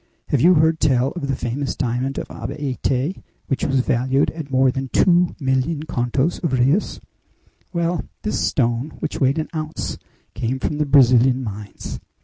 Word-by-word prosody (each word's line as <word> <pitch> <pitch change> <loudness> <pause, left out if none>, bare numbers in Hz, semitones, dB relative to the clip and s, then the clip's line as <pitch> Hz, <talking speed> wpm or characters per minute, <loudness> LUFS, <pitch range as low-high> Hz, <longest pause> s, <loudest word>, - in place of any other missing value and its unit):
Have 140 - +2
you 180 +4 +6
heard 160 +1 +3
tell 135 -2 +2
of 170 -6 -5
the 135 - 0
famous 125 +4 -3
diamond 130 +2 -2
of - - -4
Abaete, 135 +3 -2 0.2
which 135 - -2
was 135 -2 +2
valued 130 +1 +1
at 160 -3 -7
more 130 0 +3
than 135 +1 -3
two 175 +3 +3
million 135 +3 0
contos 130 +2 -1
of 160 -6 0
reis? 135 +10 +1 0.7
Well, 170 -1 -1 0.2
this 210 - -1
stone, 120 +1 0
which 155 - -4
weighed 135 +2 +3
an 155 - -2
ounce, 155 0 -4 0.3
came 125 +2 -2
from 150 +3 -2
the 150 - +1
Brazilian 130 -1 +5
mines! 105 -2 -7
135 Hz, 160 wpm, -21 LUFS, 125-155 Hz, 0.7 s, you